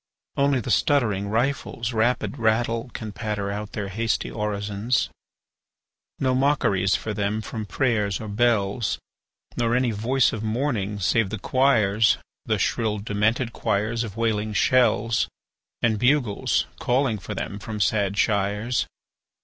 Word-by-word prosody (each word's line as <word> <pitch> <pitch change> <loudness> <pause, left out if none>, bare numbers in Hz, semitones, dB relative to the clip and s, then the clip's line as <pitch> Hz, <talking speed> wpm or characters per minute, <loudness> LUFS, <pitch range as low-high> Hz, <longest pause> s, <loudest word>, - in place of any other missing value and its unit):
Only 140 -1 +2
the 115 - -3
stuttering 110 -9 +2
rifles' 120 0 -1
rapid 115 +1 0
rattle 115 +1 +1
Can 110 -2 -5
patter 105 -1 -3
out 105 +1 -5
their 105 -2 -3
hasty 110 +1 -1
orisons. 105 +2 -1 1.1
No 130 -1 +1
mockeries 115 -9 +2
for 110 - -3
them 105 +1 -1
from 110 0 -5
prayers 105 -4 0
or 110 - -6
bells, 105 -1 +1 0.6
Nor 120 0 +1
any 125 -1 +2
voice 120 +5 +2
of 110 - -4
mourning 110 -3 -1
save 100 +2 +2
the 110 - -3
choirs 115 -5 +3 0.3
The - - +2
shrill, 110 -2 0
demented 110 +4 0
choirs 110 +4 0
of 110 -2 -7
wailing 110 -2 0
shells; 115 0 +3 0.6
And 110 -3 +2
bugles 125 -4 +2
calling 125 -3 +1
for - - -6
them 100 - -4
from 105 +1 -6
sad 100 -1 +1
shires. 105 +3 +1
110 Hz, 135 wpm, -24 LUFS, 105-120 Hz, 1.1 s, choirs